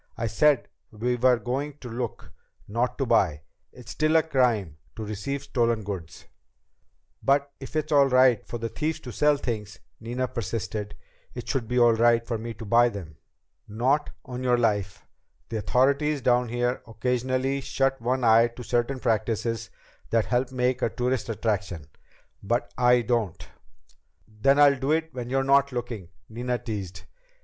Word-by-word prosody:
"I 115 - -2
said 135 +4 +3 0.2
we 120 +3 -1
were 125 0 +4
going 135 +5 -3
to 130 - -10
look, 120 0 -5 0.4
not 120 +4 -1
to 135 - 0
buy. 80 - +2 0.3
It's 120 -4 -11
still 155 - +1
a 160 - +6
crime 120 - +1 0.2
to 110 - -5
receive 110 +7 -4
stolen 115 -5 0
goods." 95 -5 -7 1.0
"But 140 +1 +2
if 135 +2 -10
it's 155 0 -1
all 140 -2 +6
right 130 -2 +4
for 120 - -4
the 115 0 -3
thieves 155 +7 -2
to 125 - -8
sell 150 +3 +3
things," 105 -6 -4 0.2
Nina 120 +3 -3
persisted, 110 -3 -4 0.4
"it - - -7
should 125 -4 -1
be 125 - -1
all 120 -1 +6
right 115 +1 +3
for 115 -2 -3
me 115 0 -6
to 110 - -9
buy 120 +3 +4
them." 85 -9 -9 0.5
"Not 130 +8 +1 0.2
on 125 -1 -6
your 125 -1 +3
life! 105 -4 -1 0.4
The 115 - -3
authorities 140 +6 +2
down 125 -1 +3
here 120 +1 -1
occasionally 130 +4 -1
shut 135 0 0
one 125 +2 0
eye 115 0 +6
to 125 - -8
certain 120 +3 0
practices 115 -1 -1 0.4
that 115 -1 +2
help 125 +1 0
make 125 0 0
a - - +2
tourist 125 +1 -2
attraction. 100 -7 -2 0.6
But 120 +5 -1
I 125 -1 +4
don't!" 115 -6 -1 0.8
"Then 110 +6 +2
I'll 140 -2 +6
do 135 +4 +1
it 160 -1 -1
when 125 -1 -5
you're 135 +1 +1
not 140 +1 +4
looking," 120 -7 -5 0.2
Nina 120 +2 -2
teased. 100 -7 -6
120 Hz, 165 wpm, -26 LUFS, 110-130 Hz, 1.0 s, a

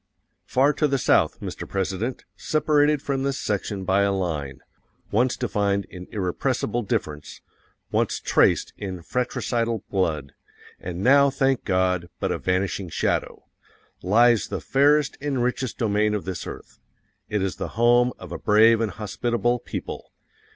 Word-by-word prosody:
Far 140 +3 +3
to 150 - +5
the 135 -1 +1
South, - - +2
Mr. - - -6
President, 100 +5 -3
separated 150 -1 +2
from 135 -1 -1
this 135 0 -1
section 100 -3 -2
by 95 +1 +2
a 100 0 +2
line 75 -9 -3 0.5
_once 125 +4 +2
defined 100 -5 0
in 90 -1 -9
irrepressible 110 +4 -1
difference, 75 -8 -4 0.5
once - - 0
traced - - +2
in 95 -4 -6
fratricidal 115 -1 -1
blood, 80 -8 -1 0.5
AND 90 +1 -5
NOW, 140 +2 +6
THANK 135 -2 0
GOD, 90 -2 +1
BUT - - -1
A - - -2
VANISHING 95 0 -1
SHADOW - - -1 0.6
lies 115 +4 +4
the - - -4
fairest 145 +1 +2
and 135 -4 -1
richest 125 0 -2
domain 105 -2 +1
of 105 - -4
this 95 -4 -5
earth. - - -10 0.5
It 105 -2 0
is 95 - -2
the - - -3
home 120 +1 +4
of 90 -3 -11
a - - -5
brave 110 +2 +5
and 115 - 0
hospitable 120 +4 -1
people. - - -7
105 Hz, 145 wpm, -24 LUFS, 95-125 Hz, 0.6 s, NOW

